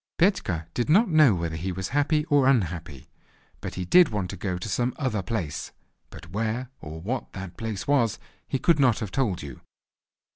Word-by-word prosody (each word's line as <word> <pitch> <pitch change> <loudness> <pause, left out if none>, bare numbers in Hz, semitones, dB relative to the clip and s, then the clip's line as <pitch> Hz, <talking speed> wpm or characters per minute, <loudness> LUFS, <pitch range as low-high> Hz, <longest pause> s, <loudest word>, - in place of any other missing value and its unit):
Petka 170 - +1
did 120 +3 -1
not 205 +8 +5
know 155 - +6
whether 85 -2 -3
he 90 +4 -3
was 95 +1 -4
happy 150 +1 +1
or 145 -4 +3
unhappy, 85 - 0 0.5
but - - -6
he 90 - -3
did 175 - +6
want 100 -4 -2
to - - -6
go 90 -1 -3
to 90 - -6
some 120 +4 -1
other 130 -8 -1
place; 90 -8 -4 0.4
but 85 0 -12
where, 115 +4 -2
or 80 +1 -7
what, 120 +9 -4
that 95 -2 -7
place 110 -3 -5
was 125 -7 +2 0.3
he - - -1
could 155 +4 +3
not 125 -5 +4
have 105 -3 -4
told 110 - 0
you. 70 -4 -9
110 Hz, 190 wpm, -26 LUFS, 90-135 Hz, 0.5 s, know